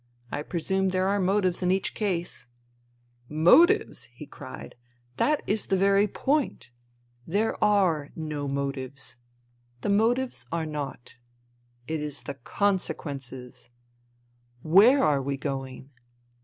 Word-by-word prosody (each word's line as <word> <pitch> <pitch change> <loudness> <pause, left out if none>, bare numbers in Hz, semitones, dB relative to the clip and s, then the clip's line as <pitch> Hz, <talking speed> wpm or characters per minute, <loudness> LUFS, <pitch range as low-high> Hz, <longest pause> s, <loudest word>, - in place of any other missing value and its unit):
" - - -40
I - - -2
presume 190 +4 -1
there 185 0 +1
are 200 +1 +1
motives 185 -1 +1
in 180 - +1
each 190 +1 +1
case." 175 - -3 0.4
" 120 0 -37 0.2
Motives! 335 +7 +5
" - - -31
he - - -8
cried. - - -10 0.2
" 120 0 -37
That 300 0 +2
is 210 +1 -1
the 195 - +2
very 200 +2 +4
point. 270 - -1 0.6
There 205 +6 0
are 180 -8 +2
no 150 -3 -4
motives. 140 -1 -4 0.6
The - - -2
motives 235 +5 +1
are 165 -1 -1
naught. 145 -6 -6 0.7
It 160 +1 -2
is 150 -1 -5
the 140 - -5
consequences. 135 - -3 0.9
Where 220 - +6
are 140 -2 +3
we 140 +1 -2
going 135 -1 -5
165 Hz, 130 wpm, -27 LUFS, 135-200 Hz, 0.9 s, Where